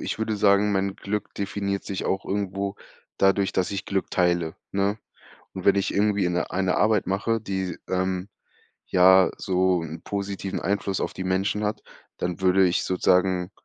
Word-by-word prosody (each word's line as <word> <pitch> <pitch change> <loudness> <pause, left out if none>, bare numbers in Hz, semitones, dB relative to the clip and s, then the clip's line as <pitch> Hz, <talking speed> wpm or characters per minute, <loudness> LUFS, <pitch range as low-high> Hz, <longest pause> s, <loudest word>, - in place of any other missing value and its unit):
ich - - -4
würde 110 -1 -1
sagen, 100 +1 +4
mein 95 0 0
Glück 105 +2 -4
definiert 100 0 -3
sich 95 - -4
auch 95 - -1
irgendwo 100 0 -2 0.4
dadurch, 95 0 +3
dass 95 - 0
ich 100 0 -3
Glück 95 -1 -2
teile, 85 -3 +1 0.2
ne? 100 +2 0 0.6
Und 95 - -6
wenn 100 - +5
ich 100 - 0
irgendwie 100 -2 +2
'ne 90 0 -1
eine 95 -1 0
Arbeit 110 -2 +2
mache, 100 +5 0
die, 95 -4 -3
ähm, 95 0 -1 0.6
ja, 95 +1 +6
so 95 -1 +1
'n 80 0 -7
positiven 100 -1 -4
Einfluss 100 -1 -1
auf - - -2
die 95 - -5
Menschen 95 +3 0
hat, 105 +1 -2 0.4
dann 90 0 -3
würde 95 0 +4
ich 90 - +1
sozusagen 90 0 +2
95 Hz, 165 wpm, -25 LUFS, 95-100 Hz, 0.6 s, ja